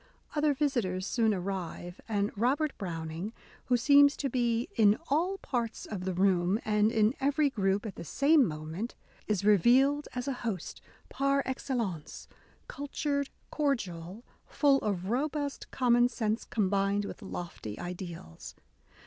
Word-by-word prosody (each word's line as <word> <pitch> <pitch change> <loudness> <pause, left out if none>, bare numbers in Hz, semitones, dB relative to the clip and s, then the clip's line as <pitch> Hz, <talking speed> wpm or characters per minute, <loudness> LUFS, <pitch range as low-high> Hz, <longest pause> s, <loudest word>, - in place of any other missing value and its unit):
Other 295 -1 +2
visitors 235 -11 0
soon 220 +2 +2
arrive; 180 -2 -4
and 205 -1 0
Robert 275 +7 +1
Browning, 165 +2 -4 0.3
who 250 - +3
seems 285 +3 +6
to 275 -3 -2
be 235 -1 +1
'*in 210 -2 +5
all 345 +7 +1
parts 235 -9 -3
of 185 -4 -5
the 190 - -1
room 185 +1 +2
and 210 0 +3
in 220 0 +3
every 285 +1 +2
group 200 -2 0
at 210 - -4
the - - -6
same 285 - +4
moment," 160 +5 -4 0.3
is 205 -2 0
revealed 255 - +4
as 250 +2 -3
a 275 - 0
host 210 -8 -4 0.3
par 275 0 +1
excel 260 0 -2
lence^ 185 -10 -4 0.2
— - - -33
cultured, 280 0 -2 0.2
cordial, 205 - -2 0.2
full 280 -2 +3
of 195 -1 -2
robust 285 +2 -2
common 245 -1 +3
sense 225 -2 -2
combined 200 -1 +1
with - - -8
lofty 175 - -6
ideals. 175 - -7
220 Hz, 140 wpm, -30 LUFS, 190-275 Hz, 0.3 s, seems